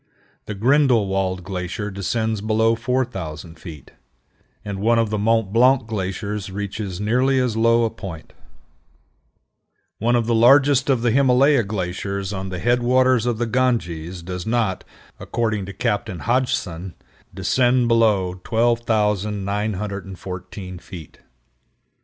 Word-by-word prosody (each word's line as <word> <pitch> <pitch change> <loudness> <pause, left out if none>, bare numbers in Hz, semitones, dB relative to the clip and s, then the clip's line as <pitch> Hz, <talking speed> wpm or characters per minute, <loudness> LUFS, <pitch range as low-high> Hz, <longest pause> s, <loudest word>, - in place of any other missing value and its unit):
The 105 - -4
Grindelwald 100 -7 +2
glacier 95 +3 -4
descends 110 +2 -2
below 110 +1 +2
4000 110 - -3
feet, 75 -3 -11 0.7
and 100 -1 -4
one 115 +3 +3
of 115 -2 +1
the 105 - -1
Mont 110 -1 +1
Blanc 125 +1 +4
glaciers 105 -1 -4
reaches 100 -1 -5
nearly 125 +6 +2
as 125 -4 0
low 115 +1 +3
a 110 - -2
point. 90 -8 -9 1.7
One 120 +3 +2
of 120 -1 +1
the 120 - +1
largest 135 +4 +5
of 130 -4 +2
the 120 - +3
Himalaya 135 +2 +4
glaciers 100 -1 -4
on 95 0 -4
the 90 - -5
head 120 +6 +1
waters 125 -1 +3
of 120 -2 0
the 120 - -1
Ganges 90 -9 -1
does 90 +2 -6
not, 110 -5 0 0.4
according 110 -5 -2
to - - -6
Captain 95 -4 -2
Hodgson, 95 -8 -1 0.4
descend 120 +6 +2
below 100 -6 +2
12,914 105 -4 -2
feet. 85 -5 -11
105 Hz, 125 wpm, -21 LUFS, 95-120 Hz, 1.7 s, largest